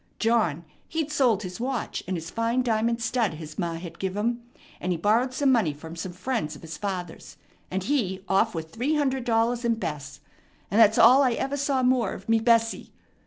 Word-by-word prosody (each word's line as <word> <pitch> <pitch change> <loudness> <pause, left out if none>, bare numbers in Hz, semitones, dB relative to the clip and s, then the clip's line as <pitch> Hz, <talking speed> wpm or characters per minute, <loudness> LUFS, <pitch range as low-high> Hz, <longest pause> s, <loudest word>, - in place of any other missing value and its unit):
John, 215 -9 +1 0.2
he'd 320 -2 -2
sold 245 -8 +2
his 180 +1 -7
watch 255 0 -3
and 185 -1 -1
his 165 0 -7
fine 230 +2 0
diamond 230 0 0
stud 230 -7 0
his 155 -1 -9
ma 170 -1 -1
had 170 0 -9
give 190 0 -3
him; 235 +3 -1 0.4
and 185 - -2
he 175 - 0
borrowed 225 +9 +2
some 270 +1 +2
money 215 - +2
from 160 +3 -10
some 175 +2 -5
friends 205 -5 -3
of - - -14
his 160 -1 -7
father's, 180 -3 -6 0.3
and 190 0 -2
he 195 -7 -1
off 195 +2 +2
with 160 -1 -5
three 260 +7 -1
hundred 265 -4 0
dollars 235 +1 +1
and 230 -1 +1
Bess; 145 -7 -5 0.5
and 215 +3 +4
that's 220 0 +6
all 265 +3 +7
I 255 -3 +3
ever 275 +4 -2
saw 275 -2 0
more 250 -4 +2
of 195 - -10
me 225 0 +3
Bessie." 230 0 +2
225 Hz, 205 wpm, -26 LUFS, 180-245 Hz, 0.5 s, all